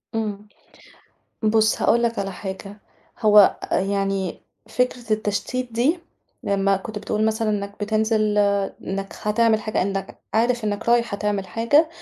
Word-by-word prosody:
امم. 210 -2 -3 1.0
بُص 220 0 +2
هاقول 235 +1 +3
لَك 235 0 0
على 195 -1 -2
حاجة، 195 +2 -7 0.4
هو 210 -3 +6 0.2
يعني 195 -1 -1 0.3
فكرة 250 -3 -1
التشتيت 220 +4 -2
دي، 260 +10 +2 0.4
لمّا 195 0 +1
كنت 215 +2 -6
بتقول 215 +1 -1
مثلًا 220 0 0
إنّك 200 -1 -3
بِتنزل 215 0 +1 0.4
إنَك 195 +1 -5
هتعمل 220 +1 +2
حاجة، 215 -3 -1
إنّك 195 0 -4
عارف 235 +1 +2
إنَك 210 +2 -2
رايح 235 -2 +3
هتعمل 205 -1 -2
حاجة 235 - +3
215 Hz, 130 wpm, -22 LUFS, 200-230 Hz, 1.0 s, هو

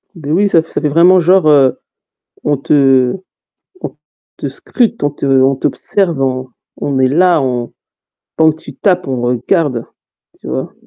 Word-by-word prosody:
Beh 150 -3 -6
oui, 200 +4 +2
ça 165 - +3
fait 165 - -16
ça - - -3
fait 150 - 0
vraiment 175 +5 +4
genre, 180 0 +3
heu, 140 -4 +3 0.6
on 145 -2 0
te 135 -3 +2 0.7
on - - -7 0.4
te - - -5
scrute, 235 - -2
on 145 - +1
te 145 - -7
on 135 0 +3
t'observe, 170 +1 -1
on 130 -1 -1 0.3
on 140 -2 -2
est 130 - +3
là, 170 +3 +3
on 125 -2 -3 0.6
quand 160 -1 +4
tu 145 -3 -12
tapes, 180 -3 0
on 130 -2 -2
regarde, 125 +2 -1 0.5
tu - - -14
vois? 65 +1 -4
145 Hz, 165 wpm, -14 LUFS, 130-170 Hz, 0.7 s, vraiment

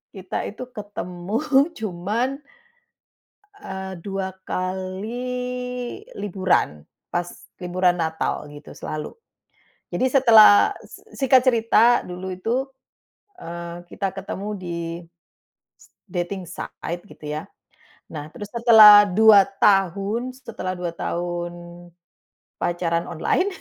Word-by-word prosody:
kita 190 -1 -4
itu 220 +5 -8
ketemu 200 - -5 0.4
cuman, 220 +7 -2 1.3
eee, 190 0 -6
2 190 -1 -4
kali 245 - -4
liburan. 185 - -1 0.3
Pas 175 0 -1 0.3
liburan 180 0 +1
Natal, 160 -2 -2
gitu, 145 0 -12
selalu. 155 - -6 0.8
Jadi 260 - +1
setelah 225 -6 +7
s - - -13 0.2
singkat 260 -1 +3
cerita, 235 0 +4
dulu 180 +1 -6
itu, 235 +8 -1 0.7
eee, 170 - -8
kita 195 -1 -3
ketemu 195 +1 -6
di 175 -3 -5 0.2
s - - -20 1.0
dating 180 0 -4
site, 175 0 -6
gitu - - -13
ya. 150 +1 -5 0.6
Nah, 150 -1 -8
terus 205 - -8
setelah 220 -3 +9
2 210 +1 +7 0.2
tahun, 200 +5 +2
setelah 230 -8 -6
2 175 -1 -4
tahun 175 0 -3 1.1
pacaran 170 -1 -1
online, 360 - 0
190 Hz, 100 wpm, -23 LUFS, 175-230 Hz, 1.3 s, setelah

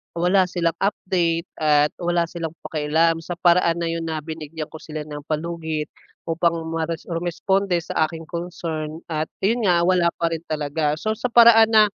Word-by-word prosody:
wala 180 +3 +3
silang 170 -2 0
update 175 -4 0 0.2
at 150 -1 +3
wala 175 -1 +1
silang 165 -2 -5
pakialam 160 +2 +1
sa 175 +2 -5
paraan 175 -1 +4
na 170 - -1
'yun 165 0 -3
na 160 -1 -2
binigyan 160 -1 -6
ko - - -8
sila 155 -1 -6
ng 150 -1 -6
palugit 160 -1 -3 0.4
upang 165 +1 +1 0.2
mares 165 0 -3
rumesponde 175 +2 0
sa 155 - +1
aking 165 -1 -8
concern 165 -3 -4 0.2
at 155 0 -1 0.2
ayun 230 +4 +2
nga 170 -1 +4
wala 180 -2 +3
pa 170 -1 0
rin 160 - -4
talaga. 150 0 -1
So 215 - -1
sa 245 +2 -2
paraan 230 -2 +7
na, 215 - +8
165 Hz, 170 wpm, -22 LUFS, 155-175 Hz, 0.4 s, na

